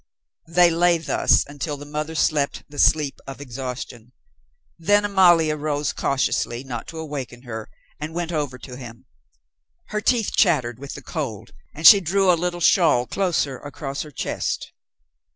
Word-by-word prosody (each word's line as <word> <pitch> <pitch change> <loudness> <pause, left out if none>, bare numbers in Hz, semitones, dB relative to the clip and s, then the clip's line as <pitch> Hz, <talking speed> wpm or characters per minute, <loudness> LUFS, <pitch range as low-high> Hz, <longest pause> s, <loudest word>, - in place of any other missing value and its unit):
They 170 +1 +4
lay 170 +1 +3
thus 160 - +2
until 145 +1 -5
the 145 - -10
mother 150 +2 -4
slept 150 -2 0
the 145 -1 -10
sleep 150 -3 +3
of 135 0 -8
exhaustion; 125 -2 -7 0.7
then 205 +5 +3
Amalia 175 -6 +4
rose 150 -1 -2
cautiously, 130 -2 -1
not 120 -4 -6
to 165 - -9
awaken 140 -6 -6
her, 110 -3 -7 0.3
and 155 +2 -6
went 175 -1 -3
over 145 -5 -2
to 125 -1 -10
him. 120 -3 -11 0.8
Her 210 0 -2
teeth 230 -1 +1
chattered 130 - +2
with 140 0 -8
the 140 - -10
cold, 130 - -5 0.2
and 155 - -5
she 200 +3 +10
drew 190 +2 +2
a - - +4
little 175 +1 -2
shawl 165 -9 +4
closer 150 -3 -1
across 145 -1 -6
her 155 - -7
chest. 145 - -4
150 Hz, 155 wpm, -22 LUFS, 135-170 Hz, 0.8 s, she